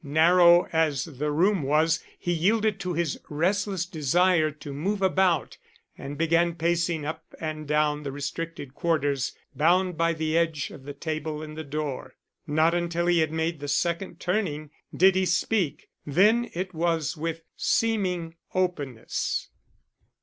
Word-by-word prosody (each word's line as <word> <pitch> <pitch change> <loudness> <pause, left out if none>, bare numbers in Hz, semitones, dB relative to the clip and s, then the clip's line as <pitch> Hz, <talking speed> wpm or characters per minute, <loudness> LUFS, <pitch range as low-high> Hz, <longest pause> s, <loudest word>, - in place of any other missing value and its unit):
Narrow 170 +4 +5
as 155 -5 +1
the 150 -1 -3
room 185 +5 +2
was, 155 +4 +2
he 175 - -1
yielded 205 +4 +1
to 180 -2 -3
his 165 -3 -1
restless 190 +3 0
desire 170 +1 +2
to 150 -1 -9
move 195 +9 -2
about 190 -2 +1 0.4
and 140 +1 -7
began 165 +1 +2
pacing 170 -2 0
up 155 - -5 0.2
and 155 -1 -5
down 150 0 +1
the 140 -2 -5
restricted 145 0 -5
quarters 145 -5 0 0.2
bounded 175 +2 +2
by 165 0 +3
the 160 0 -2
edge 165 -3 0
of 135 - -12
the 145 0 -7
table 155 0 -4
and 155 0 -8
the 160 - -5
door. 140 -3 -5 0.3
Not 155 +2 +3
until 170 0 -1
he 175 -1 +3
had 155 -1 +1
made 160 0 -1
the 145 - -6
second 170 +4 -1
turning 165 -6 -2 0.2
did 190 +2 +5
he 185 0 +1
speak; 175 -1 0 0.2
then 210 +11 +3
it 185 +1 -3
was 165 -1 0
with 165 +1 -4
seeming 180 -7 0 0.2
openness. 150 -11 -2
165 Hz, 150 wpm, -26 LUFS, 150-175 Hz, 0.4 s, Narrow